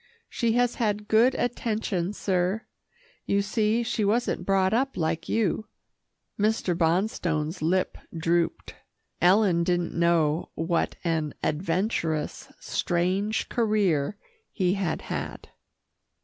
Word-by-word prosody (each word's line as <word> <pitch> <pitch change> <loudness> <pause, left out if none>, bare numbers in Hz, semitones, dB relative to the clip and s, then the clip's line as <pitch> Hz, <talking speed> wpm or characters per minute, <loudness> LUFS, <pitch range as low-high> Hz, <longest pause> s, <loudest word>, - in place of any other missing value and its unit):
She 230 -2 0
has 245 0 +2
had 210 -1 0
good 235 +5 +4
attention, 215 -6 -1
sir. 190 +2 0 0.6
You 200 0 +2
see 215 +2 +1
she 225 -1 -1
wasn't 225 +4 0
brought 195 0 +3
up 265 +4 0
like 165 0 -1
you." 215 0 0 0.7
Mr. 210 -4 +1
Bonstone's 165 -2 0
lip 180 +4 0 0.2
drooped. 170 +1 0 0.5
Ellen 180 -1 +4
didn't 175 -1 0
know 170 -2 +2
what 165 +1 0
an 160 -3 -1
adventurous, 165 -1 -1
strange 185 +5 0
career 205 -7 +1 0.3
he 185 -3 +1
had 195 -4 -2
had. - - -5
190 Hz, 105 wpm, -26 LUFS, 170-215 Hz, 0.7 s, good